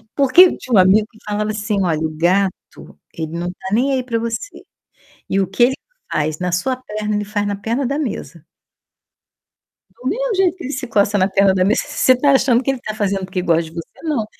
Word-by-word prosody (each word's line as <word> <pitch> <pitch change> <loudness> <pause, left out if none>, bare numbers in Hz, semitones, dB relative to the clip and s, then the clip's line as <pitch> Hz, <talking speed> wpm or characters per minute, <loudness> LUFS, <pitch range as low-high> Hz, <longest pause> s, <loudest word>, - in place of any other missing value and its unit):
porque 275 +4 +6
eu 370 - +2
tinha 250 - -2
um - - +7
amigo 195 +4 +4
que 220 - -21
falava 210 0 -2
assim: 210 0 -2
"Olha, 165 -4 0
o 155 -1 -3
gato 185 +3 -1
ele 160 -1 -5
não 175 +1 -3
tá 180 +1 -9
nem 260 +5 +2
aí 260 -1 0
pra 235 -2 -2
você. 230 - -5 0.7
E 195 - +1
o 190 - +1
que 195 +6 +2
ele 260 +2 +1 0.4
faz 155 0 -1
na 180 -1 -2
sua 180 +9 0
perna, 215 -4 -4
ele 210 - -2
faz 205 0 -2
na 205 0 -2
perna 230 +6 -2
da 280 +4 -2
mesa". 205 - -5 1.5
Do - - -7
mesmo - - -1
jeito 370 -2 +2
que 360 - -10
ele 270 - -4
se 260 -1 -4
coça 205 -2 +2
na 185 -1 +3
perna 195 0 +3
da 185 -1 +2
mesa, 210 +4 +2
você 290 -3 +3
tá 280 +3 +2
achando 260 -2 +3
que 270 - +1
ele 265 - -5
tá 215 - -5
fazendo 195 -2 -1
porque 185 0 -3
gosta 170 -1 +2
de 160 - -11
você? 165 -1 -6 0.2
Não, 295 -9 -1
210 Hz, 230 wpm, -19 LUFS, 185-255 Hz, 1.5 s, um